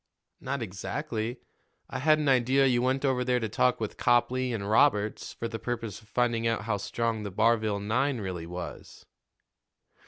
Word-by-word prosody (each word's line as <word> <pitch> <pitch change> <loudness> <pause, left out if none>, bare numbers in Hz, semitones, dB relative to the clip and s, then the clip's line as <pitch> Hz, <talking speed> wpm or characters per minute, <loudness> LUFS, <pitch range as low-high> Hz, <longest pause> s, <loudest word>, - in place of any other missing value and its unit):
"Not 140 -2 -3
exactly; 115 - -4 0.5
I - - -5
had 155 +3 +4
an 150 -1 -1
idea 130 +1 +4
you 125 -2 +3
went 130 +2 +1
over 130 -2 +1
there 125 0 +1
to 115 - -2
talk 65 -11 +2
with - - -4
Copley 125 +1 +2
and 100 -4 -3
Roberts 110 -2 +2
for 115 - -4
the 115 -1 -5
purpose 115 -2 -4
of 110 - -22
finding 115 +1 +1
out 115 -2 0
how 110 -2 -1
strong 115 +2 -2
the 105 - -4
Barville 110 0 +2
nine 125 +6 0
really 90 -5 -5
was." 85 -2 -8
115 Hz, 175 wpm, -28 LUFS, 105-130 Hz, 0.5 s, had